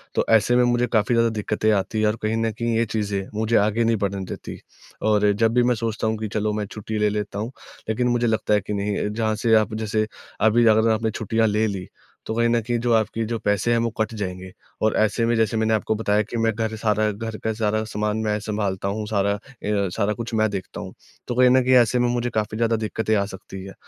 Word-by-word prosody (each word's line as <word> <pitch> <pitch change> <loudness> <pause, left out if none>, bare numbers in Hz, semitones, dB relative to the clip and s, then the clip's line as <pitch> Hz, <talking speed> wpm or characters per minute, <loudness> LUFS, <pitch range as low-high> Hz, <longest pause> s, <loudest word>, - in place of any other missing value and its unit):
तो - - +2
ऐसे 110 +2 +4
में 125 - +5
मुझे 120 0 +2
काफ़ी 110 +1 +2
ज़्यादा 115 0 +3
दिक्कतें 110 0 0
आती 105 +1 0
हैं 110 - +3
और 105 - +1
कहीं 110 +1 0
न 115 0 0
कहीं 115 +2 -2
ये 115 - +2
चीज़ें 100 -3 -2
मुझे 110 +1 +1
आगे 105 +3 +2
नहीं 115 0 +2
बढ़ने 100 -2 -2
देती। - - -7 0.4
और 105 -1 +3
जब 110 +2 +1
भी 125 0 +4
मैं 125 0 +2
सोचता 110 -1 -2
हूँ 110 0 0
कि 110 0 -4
चलो 105 0 0
मैं 105 0 -2
छुट्टी 110 +1 -6
ले 105 0 +3
लेता 105 -1 -3
हूँ, 110 +4 -4 0.4
लेकिन 125 +3 +1
मुझे 120 0 +1
लगता 110 -1 +1
है 105 - +3
कि 100 - -5
नहीं 100 0 -1
जहाँ 110 -1 0
से 110 +1 +3
आप 110 -1 +2
जैसे 110 0 -1 0.3
अभी 110 +2 +4
अगर 110 +1 +4
आपने 110 0 0
छुट्टियाँ 110 +1 0
ले 105 +1 +1
ली, 95 -3 -5 0.4
तो - - -3
कहीं 115 0 +2
न 120 0 +3
कहीं 120 +2 -1
जो 120 +1 0
आपके 110 0 +1
जो 115 +1 -2
पैसे 105 +3 +1
हैं 120 - +3
वो 115 - 0
कट 110 +1 0
जाएँगे 95 -2 -5 0.3
और 110 - +2
ऐसे 110 +2 +2
में 120 +1 +2
जैसे 110 0 +1
मैंने 110 0 +1
आपको 110 0 0
बताया 105 -1 +1
कि 115 +3 -6
मैं 115 0 +2
घर 110 0 -2
सारा 110 -1 +1
घर 110 +1 -6
का 110 - 0
सारा 110 0 0
सामान 105 0 -2
मैं 105 0 +1
सँभालता 100 -2 -2
हूँ 105 +2 -2
सारा 100 -2 +1
अ, - - -9 0.3
सारा 100 0 0
कुछ 115 +1 -6
मैं 110 0 +2
देखता 100 -2 -6
हूँ। - - -8 0.3
तो 120 - -2
कहीं 125 0 +5
न 130 +1 +5
कहीं 130 +1 +3
ऐसे 120 +2 +1
में 120 - +2
मुझे 120 0 -1
काफ़ी 110 -1 -2
ज़्यादा 115 0 +2
दिक्कतें 110 0 -1
आ 100 -1 +1
सकती 95 -1 -9
है, 95 0 -9
110 Hz, 250 wpm, -23 LUFS, 105-115 Hz, 0.4 s, में